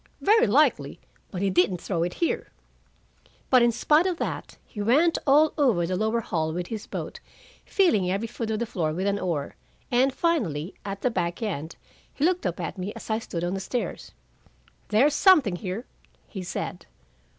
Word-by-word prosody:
"Very 445 Hz, +4 st, +4 dB
likely. -, -, +2 dB, 0.3 s
But 190 Hz, 0 st, -4 dB
he 195 Hz, -, +1 dB
didn't 180 Hz, 0 st, +2 dB
throw 170 Hz, -2 st, -2 dB
it 175 Hz, +1 st, -1 dB
here." 335 Hz, -, -1 dB, 1.0 s
But 255 Hz, -2 st, +7 dB
in 235 Hz, 0 st, +4 dB
spite 300 Hz, +9 st, +3 dB
of 360 Hz, -3 st, -1 dB
that, -, -, -5 dB
he 210 Hz, -, -7 dB
went 290 Hz, +11 st, +3 dB
over 295 Hz, +3 st, +5 dB, 0.2 s
all 175 Hz, 0 st, 0 dB
the 185 Hz, +2 st, -2 dB
lower 220 Hz, +4 st, 0 dB
hall 160 Hz, -6 st, -2 dB
with 175 Hz, +1 st, -3 dB
his 215 Hz, +2 st, -6 dB
boat, -, -, -6 dB, 0.5 s
feeling 220 Hz, -, +2 dB
every 195 Hz, +4 st, -1 dB
foot 230 Hz, -1 st, -5 dB
of 220 Hz, -, 0 dB
the 235 Hz, -, -1 dB
floor 165 Hz, -9 st, -2 dB
with 185 Hz, +4 st, -2 dB
an 200 Hz, 0 st, 0 dB
oar, 160 Hz, -7 st, -3 dB, 0.4 s
and 255 Hz, +2 st, +3 dB
finally, 205 Hz, -, -1 dB
at 200 Hz, 0 st, -5 dB
the 250 Hz, -, +1 dB
back 175 Hz, 0 st, -2 dB
end, 165 Hz, -7 st, -4 dB, 0.4 s
he 290 Hz, -, +1 dB
looked 360 Hz, -, +1 dB
up 175 Hz, 0 st, -4 dB
at 175 Hz, +3 st, -5 dB
me 185 Hz, +3 st, -3 dB
as -, -, -7 dB
I 220 Hz, -, +1 dB
stood 170 Hz, -6 st, -5 dB
on 175 Hz, +1 st, -1 dB
the 195 Hz, -, -2 dB
stairs. 200 Hz, 0 st, -4 dB, 0.8 s
"There's 260 Hz, +8 st, +3 dB
something 295 Hz, -, +5 dB
here," 195 Hz, +6 st, -5 dB, 0.4 s
he 190 Hz, -, -7 dB
said. 180 Hz, -, -5 dB
205 Hz, 185 wpm, -26 LUFS, 180-255 Hz, 1.0 s, But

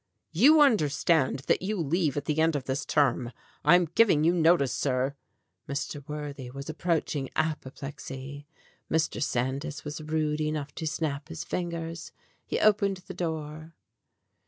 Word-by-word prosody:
"You 280 Hz, -, +6 dB
understand 155 Hz, -, +3 dB
that -, -, +2 dB
you 205 Hz, +3 st, -2 dB
leave 160 Hz, -2 st, 0 dB
at 145 Hz, -, -2 dB
the 150 Hz, +1 st, 0 dB
end 160 Hz, 0 st, +3 dB
of 140 Hz, -, -2 dB
this 130 Hz, +2 st, -3 dB
term. 130 Hz, -4 st, +2 dB, 0.3 s
I 175 Hz, -, +7 dB
am 180 Hz, 0 st, +4 dB
giving 170 Hz, -2 st, +3 dB
you 170 Hz, +2 st, +4 dB
notice, 165 Hz, -6 st, +3 dB
sir." 130 Hz, 0 st, 0 dB, 0.6 s
Mr. 140 Hz, +1 st, -4 dB
Worthy 145 Hz, -4 st, -5 dB
was 140 Hz, +4 st, -6 dB
approaching 155 Hz, -4 st, -1 dB
apoplexy. 140 Hz, -2 st, -4 dB, 0.4 s
Mr. 160 Hz, 0 st, 0 dB
Sandys 140 Hz, +4 st, -2 dB
was 150 Hz, +1 st, -5 dB
rude 155 Hz, 0 st, -1 dB
enough 150 Hz, -2 st, -2 dB
to 160 Hz, -, -4 dB
snap 155 Hz, -2 st, -2 dB
his 165 Hz, -1 st, -5 dB
fingers. 170 Hz, -1 st, -4 dB, 0.4 s
He -, -, -1 dB
opened 200 Hz, -2 st, +3 dB
the -, -, -7 dB
door. 160 Hz, -1 st, -5 dB
155 Hz, 145 wpm, -28 LUFS, 140-165 Hz, 0.6 s, I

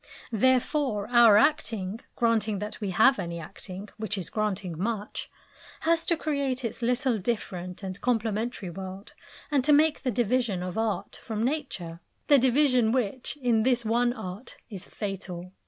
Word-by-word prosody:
Therefore 255 Hz, -1 st, +1 dB
our 235 Hz, -4 st, +7 dB
acting 225 Hz, -7 st, +1 dB, 0.2 s
(granting 225 Hz, -3 st, +1 dB
that 210 Hz, +3 st, -6 dB
we 205 Hz, -, -2 dB
have 220 Hz, +8 st, +4 dB
any 170 Hz, 0 st, -4 dB
acting, 190 Hz, +4 st, -8 dB
which 215 Hz, -1 st, -3 dB
is 180 Hz, -4 st, -4 dB
granting 200 Hz, -5 st, -2 dB
much) 210 Hz, +4 st, -3 dB, 0.5 s
has 330 Hz, +1 st, +1 dB
to 335 Hz, -, +2 dB
create 280 Hz, -5 st, -1 dB
its 230 Hz, -, -4 dB
little 245 Hz, 0 st, +1 dB
different 185 Hz, -3 st, -4 dB
and 190 Hz, 0 st, -6 dB
complementary 225 Hz, -4 st, -1 dB
world, 190 Hz, +3 st, -8 dB, 0.4 s
and 280 Hz, -3 st, +3 dB
to 300 Hz, -, +3 dB
make 305 Hz, +1 st, +4 dB
the 260 Hz, -, -1 dB
division 235 Hz, -4 st, 0 dB
of 180 Hz, -1 st, -5 dB
"art" 220 Hz, -2 st, -2 dB
from 220 Hz, 0 st, -2 dB
Nature 245 Hz, -, -3 dB, 0.3 s
the 285 Hz, -2 st, +6 dB
division 255 Hz, -2 st, +3 dB
which, 255 Hz, +3 st, -1 dB
in 235 Hz, -3 st, +3 dB
this 245 Hz, 0 st, +2 dB
one 240 Hz, +2 st, +2 dB
art, 200 Hz, -1 st, -8 dB
is 195 Hz, -3 st, -8 dB
fatal. 185 Hz, -3 st, -6 dB
225 Hz, 155 wpm, -27 LUFS, 195-255 Hz, 0.5 s, our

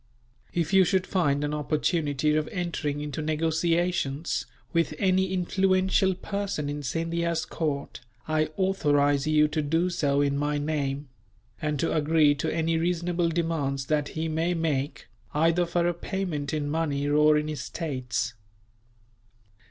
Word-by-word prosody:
If 170 Hz, +1 st, -1 dB
you 190 Hz, -1 st, +7 dB
should 185 Hz, +1 st, +1 dB
find 145 Hz, -6 st, +1 dB
an 145 Hz, 0 st, -1 dB
opportunity 150 Hz, -1 st, 0 dB
of 155 Hz, -1 st, 0 dB
entering 155 Hz, -5 st, -3 dB
into 150 Hz, 0 st, -4 dB
negotiations, 160 Hz, -1 st, 0 dB, 0.3 s
with 165 Hz, -2 st, +1 dB
any 190 Hz, 0 st, +2 dB
influential 190 Hz, +1 st, +2 dB
person 200 Hz, -7 st, -3 dB
in 145 Hz, 0 st, -4 dB
Scindia's 165 Hz, +3 st, -1 dB
court, 145 Hz, -4 st, -3 dB, 0.3 s
I 155 Hz, 0 st, +1 dB
authorize 145 Hz, -7 st, +2 dB
you 150 Hz, 0 st, +4 dB
to 155 Hz, 0 st, -1 dB
do 165 Hz, +5 st, +1 dB
so 145 Hz, -5 st, +1 dB
in 140 Hz, -1 st, +1 dB
my 145 Hz, 0 st, 0 dB
name; 145 Hz, -2 st, -2 dB, 0.5 s
and 150 Hz, -2 st, -1 dB
to 165 Hz, -, 0 dB
agree 155 Hz, -1 st, +4 dB
to 140 Hz, -, -2 dB
any 165 Hz, 0 st, 0 dB
reasonable 175 Hz, 0 st, 0 dB
demands 160 Hz, -5 st, -1 dB
that 150 Hz, -1 st, +1 dB
he 160 Hz, +1 st, -1 dB
may 165 Hz, +3 st, 0 dB
make, 145 Hz, -6 st, -2 dB, 0.3 s
either 165 Hz, +3 st, +3 dB
for 170 Hz, 0 st, +1 dB
a 175 Hz, -, +1 dB
payment 170 Hz, -5 st, -3 dB
in 150 Hz, -2 st, -1 dB
money 145 Hz, -2 st, -1 dB
or 150 Hz, +1 st, +5 dB
in 150 Hz, 0 st, -1 dB
estates. 130 Hz, -5 st, -3 dB
155 Hz, 140 wpm, -27 LUFS, 145-170 Hz, 0.5 s, you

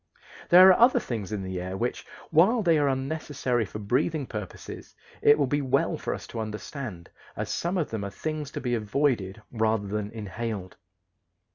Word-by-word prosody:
There 185 Hz, +1 st, +9 dB
are 185 Hz, -, +5 dB
other 240 Hz, +2 st, +6 dB
things 110 Hz, -5 st, -5 dB
in 105 Hz, -2 st, -3 dB
the 95 Hz, -1 st, -4 dB
air 95 Hz, +1 st, -4 dB
which, 120 Hz, +3 st, -3 dB, 0.2 s
while 200 Hz, +9 st, +4 dB
they 165 Hz, -4 st, +4 dB
are 145 Hz, -, +2 dB
unnecessary 135 Hz, -3 st, -1 dB
for 100 Hz, -, -8 dB
breathing 130 Hz, +8 st, 0 dB
purposes, 105 Hz, -6 st, -8 dB, 0.3 s
it 145 Hz, -, +6 dB
will 145 Hz, -, +2 dB
be 145 Hz, +3 st, 0 dB
well 135 Hz, 0 st, +1 dB
for -, -, -3 dB
us -, -, -9 dB
to 115 Hz, -, -5 dB
understand, 110 Hz, -, -6 dB, 0.3 s
as -, -, -3 dB
some 175 Hz, +3 st, -1 dB
of 165 Hz, -, -1 dB
them 110 Hz, -3 st, -3 dB
are 100 Hz, -, -3 dB
things 155 Hz, +5 st, -4 dB
to -, -, -4 dB
be 125 Hz, -2 st, -1 dB
avoided 110 Hz, -3 st, 0 dB
rather 110 Hz, -2 st, +1 dB
than 105 Hz, +1 st, -3 dB
inhaled. 105 Hz, -3 st, -5 dB
120 Hz, 180 wpm, -27 LUFS, 105-145 Hz, 0.3 s, There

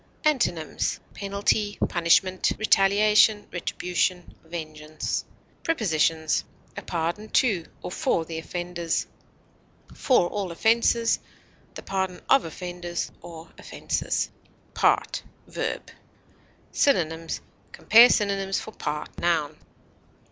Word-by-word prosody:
Antonyms: 175 Hz, -, 0 dB
penalty, 205 Hz, +1 st, -1 dB
punishment, 185 Hz, +2 st, +2 dB
retaliation, 210 Hz, +1 st, +4 dB
retribution, 180 Hz, 0 st, -2 dB
vengeance. 155 Hz, -2 st, -5 dB, 0.4 s
Prepositions: 160 Hz, -, +1 dB, 0.3 s
A -, -, -5 dB
pardon 175 Hz, +5 st, -3 dB
to 200 Hz, -11 st, +2 dB, 0.2 s
or -, -, -5 dB
for 165 Hz, -2 st, 0 dB
the 160 Hz, 0 st, -5 dB
offenders; 175 Hz, 0 st, -3 dB, 0.9 s
for 245 Hz, -10 st, +3 dB
all 195 Hz, -1 st, -3 dB
offenses; 230 Hz, +4 st, +2 dB, 0.6 s
the -, -, -8 dB
pardon 190 Hz, -2 st, -2 dB
of 270 Hz, -, +5 dB
offenders 175 Hz, +1 st, -5 dB
or 165 Hz, 0 st, -11 dB
offenses. -, -, -2 dB, 0.4 s
PART, -, -, +2 dB, 0.2 s
v. -, -, -2 dB, 1.0 s
Synonyms: 165 Hz, -, +1 dB, 0.3 s
Compare 235 Hz, +3 st, +7 dB
synonyms 195 Hz, -2 st, +1 dB
for -, -, -8 dB
PART, 150 Hz, -6 st, -5 dB
_n. 160 Hz, -3 st, 0 dB
180 Hz, 90 wpm, -25 LUFS, 165-210 Hz, 1.0 s, Compare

